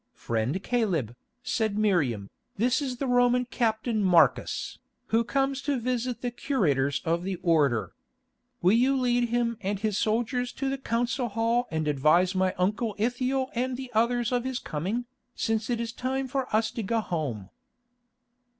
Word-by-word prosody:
"Friend 120 - -2
Caleb," 180 - 0 0.3
said 220 -4 -1
Miriam, 145 - +1 0.3
"this 250 +6 +2
is 260 -3 -3
the 275 - -2
Roman 245 0 +3
captain 225 -2 0
Marcus, 170 -8 +2 0.3
who 225 +1 +3
comes 270 +2 0
to 280 -2 -1
visit 245 0 -2
the 245 - -1
curators 150 - 0
of 170 +1 +1
the 190 +1 -3
Order. 145 - +2 0.7
Will 185 +3 +5
you 260 +4 +3
lead 245 -1 +1
him 235 -1 0
and 200 +1 -1
his 210 -1 0
soldiers 240 +3 0
to 275 0 -2
the 270 - -3
council 245 +1 -1
hall 230 +3 +1
and 160 -1 -2
advise 155 +6 +3
my 185 -1 +1
uncle 210 +4 0
Ithiel 255 +4 0
and 250 +1 -1
the 260 -1 -7
others 235 +1 +2
of 245 -1 +1
his 260 -1 -2
coming, 195 +11 -3 0.3
since 225 0 -1
it 240 -1 0
is 230 0 -3
time 265 +2 -2
for 265 0 -2
us 220 +1 +2
to 230 - -4
go 225 +3 0
home?" 140 - -3
230 Hz, 160 wpm, -27 LUFS, 185-245 Hz, 0.7 s, Will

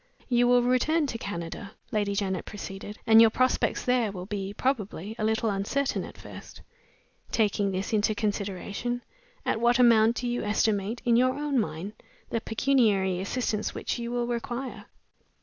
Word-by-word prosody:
"You 245 -1 +4
will 245 0 +5
return 290 +6 +2
to 230 -5 -4
Canada," 195 +1 -6 0.2
Lady 205 -2 0
Janet 190 -2 -1
proceeded; 205 0 -8
"and 225 0 +8
your 225 - +8
prospects 255 +3 +1
there 250 -4 +2
will 180 -2 -7
be, 200 -1 -4
probably, 215 -4 -2
a - - -1
little 220 0 +1
uncertain 205 +8 -1
at - - -12
first. - - -11 0.7
Taking 205 -2 +1
this 190 +3 -3
into 215 0 +2
consideration, 205 +3 -3 0.4
at 225 - 0
what 240 0 +4
amount 230 -2 +5
do 245 - -3
you 240 0 -1
estimate, 210 +1 0
in 235 -1 +4
your 255 +1 +3
own 290 -2 0
mind, 195 0 -3 0.4
the 230 - -1
pecuniary 215 -7 +2
assistance 215 +1 -2
which - - -3
you 235 0 -4
will 240 0 0
require?" 245 +2 -4
220 Hz, 160 wpm, -27 LUFS, 200-245 Hz, 0.7 s, and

